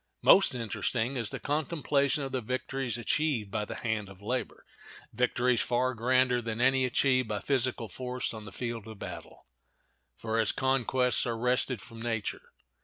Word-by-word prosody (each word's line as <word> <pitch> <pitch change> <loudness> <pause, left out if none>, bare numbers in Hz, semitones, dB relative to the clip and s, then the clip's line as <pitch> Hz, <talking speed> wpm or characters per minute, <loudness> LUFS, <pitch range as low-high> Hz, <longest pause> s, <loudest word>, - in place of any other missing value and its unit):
Most 195 -8 +6
interesting 120 +2 -1
is 115 -4 0
the - - -5
contemplation 145 -1 0
of 135 - -4
the 130 -1 -1
victories 130 +1 -2
achieved 120 -3 0
by 105 0 -1
the - - -6
hand 110 -4 -2
of 95 -1 -13
labor—victories 125 +1 -2
far 125 +1 +1
grander 125 +1 +2
than 115 -1 -4
any 130 +1 +4
achieved 130 0 +2
by 105 -1 -2
physical 130 -3 +1
force 125 +1 -4
on 110 -1 -8
the 100 - -9
field 115 0 -4
of 110 -1 -9
battle; - - -9 0.7
for 115 0 0
its 110 - +1
conquests 130 -1 +1
are 115 -1 -1
wrested 125 -2 0
from 115 +3 -11
nature. 115 -3 -3
125 Hz, 160 wpm, -30 LUFS, 115-130 Hz, 0.7 s, Most